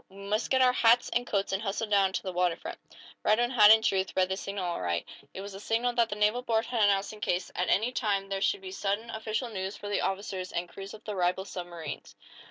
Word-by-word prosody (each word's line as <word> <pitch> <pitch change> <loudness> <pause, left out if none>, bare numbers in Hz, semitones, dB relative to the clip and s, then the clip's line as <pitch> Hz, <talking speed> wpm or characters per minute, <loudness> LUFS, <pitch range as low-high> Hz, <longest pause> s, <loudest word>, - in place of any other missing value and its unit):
"We 190 - -16
must 205 +3 -2
get 260 -1 +4
our 250 0 +5
hats 235 0 +4
and 245 0 -1
coats, 200 -1 0
and 195 - 0
hustle 215 +1 -2
down 200 -2 +3
to - - -2
the 185 - -3
water 180 -1 +2
front." - - -8 0.4
Radwin, 240 +3 +3
had 210 -5 +7
in 220 0 +7
truth, 190 -4 +1
read 185 -1 +2
the 190 - 0
signal 195 -1 -4
aright. 90 - -2 0.2
It 190 - -7
was 200 0 -8
the 195 - -8
signal 230 +4 0
that 235 -1 +2
the 205 - -3
naval 210 +4 +2
board 225 -2 0
had 240 -2 -1
announced 200 0 +2
in 210 - -12
case, 180 -3 -1
at 180 - 0
any 225 +5 +2
time, 205 -6 0
there 195 0 -3
should 405 - +1
be 380 -1 -7
sudden, 220 - -2
official 220 +3 -3
news 190 -2 -4
for 205 - -7
the 205 - 0
officers 190 -1 -3
and 175 +1 -2
crews 195 +4 -9
of 215 - -15
the 210 - -4
rival 180 +1 0
submarines. 175 -6 -7
205 Hz, 250 wpm, -29 LUFS, 190-225 Hz, 0.4 s, had